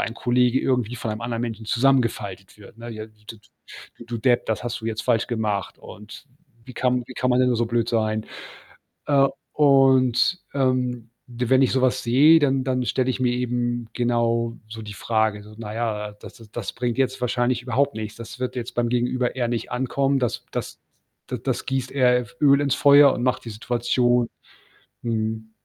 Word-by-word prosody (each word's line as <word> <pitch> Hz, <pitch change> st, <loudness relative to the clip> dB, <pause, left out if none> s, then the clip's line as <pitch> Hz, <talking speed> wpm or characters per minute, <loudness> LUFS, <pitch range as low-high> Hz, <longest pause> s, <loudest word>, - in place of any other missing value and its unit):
ein 110 Hz, -, -2 dB
Kollege 125 Hz, +1 st, +2 dB
irgendwie 125 Hz, -2 st, 0 dB
von 115 Hz, -, -4 dB
einem 105 Hz, -, -5 dB
anderen 115 Hz, 0 st, -3 dB
Menschen 115 Hz, -2 st, -5 dB
zusammengefaltet 115 Hz, -7 st, 0 dB
wird, 105 Hz, +2 st, -15 dB
ne? 120 Hz, -, -8 dB
„J 110 Hz, -1 st, -8 dB, 0.2 s
d 115 Hz, -, -10 dB, 0.6 s
d -, -, -11 dB
du 120 Hz, -, -4 dB
Depp, 120 Hz, +2 st, +2 dB
das 110 Hz, +2 st, -2 dB
hast 120 Hz, -1 st, -4 dB
du 110 Hz, -, -6 dB
jetzt 115 Hz, 0 st, -3 dB
falsch 115 Hz, -3 st, +1 dB
gemacht.“ 105 Hz, -5 st, -2 dB
Und 105 Hz, +7 st, -12 dB, 0.4 s
„Wie 130 Hz, -, -11 dB
kann 125 Hz, 0 st, 0 dB
wie -, -, -9 dB
kann 125 Hz, 0 st, -1 dB
man 125 Hz, -, +3 dB
denn 130 Hz, 0 st, +4 dB
nur 120 Hz, -, +1 dB
so 120 Hz, -, +1 dB
blöd 115 Hz, 0 st, 0 dB
sein?“ 110 Hz, -2 st, 0 dB, 0.8 s
Äh, 140 Hz, -2 st, +4 dB, 0.2 s
und, 135 Hz, 0 st, +4 dB
ähm, 125 Hz, -3 st, 0 dB, 0.2 s
d 125 Hz, 0 st, -4 dB
wenn 130 Hz, +1 st, +5 dB
ich 130 Hz, -, +2 dB
so 130 Hz, -, +1 dB
was 130 Hz, 0 st, +2 dB
sehe, 145 Hz, +7 st, +6 dB
dann 135 Hz, -3 st, +1 dB
dann 130 Hz, -1 st, -1 dB
stelle 130 Hz, +2 st, 0 dB
ich -, -, -3 dB
mir 125 Hz, -1 st, +2 dB
eben 120 Hz, -1 st, -2 dB
genau 115 Hz, -1 st, 0 dB
so 110 Hz, +1 st, -8 dB
die 105 Hz, -1 st, -8 dB
Frage 110 Hz, 0 st, 0 dB
so: 105 Hz, +1 st, -14 dB
„Na 110 Hz, -1 st, -7 dB
ja, 105 Hz, -3 st, -3 dB
das -, -, -11 dB
das 115 Hz, -2 st, -16 dB
das 120 Hz, -4 st, -5 dB
bringt 120 Hz, 0 st, -3 dB
jetzt 130 Hz, -1 st, 0 dB
wahrscheinlich 125 Hz, 0 st, 0 dB
überhaupt 135 Hz, +3 st, 0 dB
nichts. 110 Hz, -1 st, -6 dB
Das 115 Hz, +2 st, -9 dB
wird 125 Hz, 0 st, -3 dB
jetzt 120 Hz, -1 st, -5 dB
beim 120 Hz, -1 st, 0 dB
Gegenüber 125 Hz, +1 st, 0 dB
eher 125 Hz, -2 st, -1 dB
nicht 120 Hz, 0 st, -3 dB
ankommen. 135 Hz, +2 st, 0 dB
Das 120 Hz, -2 st, -2 dB
das -, -, -5 dB, 0.5 s
da -, -, -4 dB
das -, -, -3 dB
gießt 130 Hz, -1 st, -2 dB
eher 125 Hz, -2 st, +4 dB
F 125 Hz, +1 st, -11 dB
Öl 140 Hz, -1 st, +5 dB
ins 140 Hz, -2 st, +1 dB
Feuer 140 Hz, 0 st, +7 dB
und 120 Hz, -, -3 dB
macht 125 Hz, -, 0 dB
die 115 Hz, -, -7 dB
Situation“ 120 Hz, +2 st, +1 dB, 0.7 s
mhm. 110 Hz, -1 st, -3 dB
120 Hz, 200 wpm, -23 LUFS, 115-130 Hz, 0.8 s, Feuer